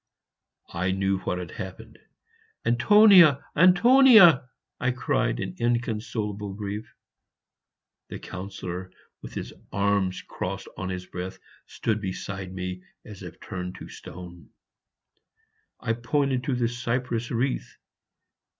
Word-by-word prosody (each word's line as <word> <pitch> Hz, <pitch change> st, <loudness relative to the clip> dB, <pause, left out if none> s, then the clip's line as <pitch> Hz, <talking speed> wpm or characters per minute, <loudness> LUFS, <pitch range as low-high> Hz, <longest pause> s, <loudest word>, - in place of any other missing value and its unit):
I 90 Hz, +2 st, -1 dB
knew 95 Hz, 0 st, 0 dB
what 90 Hz, -, -3 dB
had 90 Hz, -3 st, -6 dB
happened. -, -, -9 dB, 0.7 s
"Antonia! 170 Hz, -, +6 dB
Antonia!" 185 Hz, -, +7 dB, 0.3 s
I 125 Hz, -, +1 dB
cried, 120 Hz, -, 0 dB
in -, -, -4 dB
inconsolabie 110 Hz, -4 st, -2 dB
grief. 105 Hz, +1 st, -5 dB, 1.2 s
The -, -, -7 dB
Councillor, 95 Hz, -1 st, -7 dB, 0.3 s
with -, -, -10 dB
his -, -, -5 dB, 0.2 s
arms 100 Hz, -2 st, 0 dB
crossed -, -, -5 dB
on 95 Hz, -, -5 dB
his 90 Hz, 0 st, -5 dB
breast, 90 Hz, +1 st, -7 dB, 0.3 s
stood 110 Hz, -1 st, -2 dB
beside 95 Hz, -1 st, -5 dB
me, 90 Hz, 0 st, -5 dB, 0.2 s
as 105 Hz, -3 st, -11 dB
if -, -, -10 dB
turned 90 Hz, -1 st, -6 dB
into -, -, -10 dB
stone. 90 Hz, 0 st, -11 dB, 1.3 s
I 115 Hz, -, -1 dB
pointed 130 Hz, +2 st, -1 dB
to 135 Hz, -, 0 dB
the 120 Hz, -1 st, +1 dB
cypress 120 Hz, -1 st, -2 dB
wreath. 125 Hz, +3 st, -2 dB
105 Hz, 115 wpm, -26 LUFS, 95-125 Hz, 1.3 s, Antonia